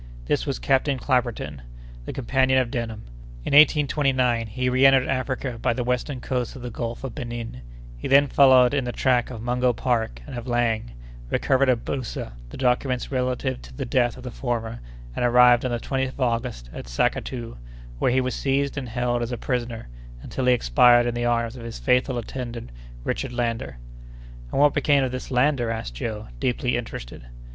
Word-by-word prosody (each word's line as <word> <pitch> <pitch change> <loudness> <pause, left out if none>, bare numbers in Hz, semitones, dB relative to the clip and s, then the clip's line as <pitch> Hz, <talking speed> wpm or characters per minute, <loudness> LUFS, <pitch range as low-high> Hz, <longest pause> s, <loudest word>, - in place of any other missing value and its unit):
This - - 0
was - - -1
Captain 135 - +1
Clapperton, 120 - -1 0.4
the - - -4
companion 130 0 +1
of 125 -2 +1
Denham. 110 -3 -4 0.4
In - - -2
1829 135 -5 +4
he 125 +4 -2
reentered 130 +1 +5
Africa 130 -2 -2
by - - +2
the 125 - -2
western 125 +2 -2
coast 125 0 -3
of 130 - -9
the 125 - -5
Gulf 115 +2 -5
of 130 -4 -5
Benin; 120 - -6 0.4
he - - -4
then 140 +1 +6
followed 130 -2 +5
in 140 -2 +1
the 120 - -2
track 125 -1 +1
of 115 -3 -7
Mungo 125 +1 +1
Park 115 - -1
and - - -8
of 120 +1 -6
Laing, 115 - 0 0.4
recovered 135 0 +2
at 120 -2 +1
Boussa 130 - -4 0.2
the - - -9
documents 125 0 0
relative 130 0 -1
to - - -13
the 135 - -3
death 120 -1 +1
of 125 - -11
the 125 - -6
former, 115 -2 -3 0.4
and - - -1
arrived 125 0 +6
on - - 0
the 120 - -1
20th 130 +1 -2
of - - -9
August 115 - -2
at - - -8
Sackatoo, 115 - -2 0.4
where - - +2
he 130 +1 +3
was 130 0 -2
seized 140 +1 0
and 130 -3 -7
held 120 +1 -1
as 120 +1 -3
a 120 - -3
prisoner, 120 -3 -3 0.4
until 130 - -3
he 125 - +6
expired 120 - +5
in 120 - -1
the 120 0 -2
arms 115 0 0
of 120 - -9
his 115 -1 -6
faithful 125 -1 +1
attendant 120 - -6 0.3
Richard 130 - -3
Lander." 115 - -2 0.7
"And - - -1
what 145 0 +5
became 145 -1 +3
of 130 - -1
this 130 0 -6
Lander?" 125 -2 +2
asked 110 - -4
Joe, 105 - -5
deeply 125 0 0
interested. - - -6
125 Hz, 185 wpm, -24 LUFS, 115-130 Hz, 0.7 s, then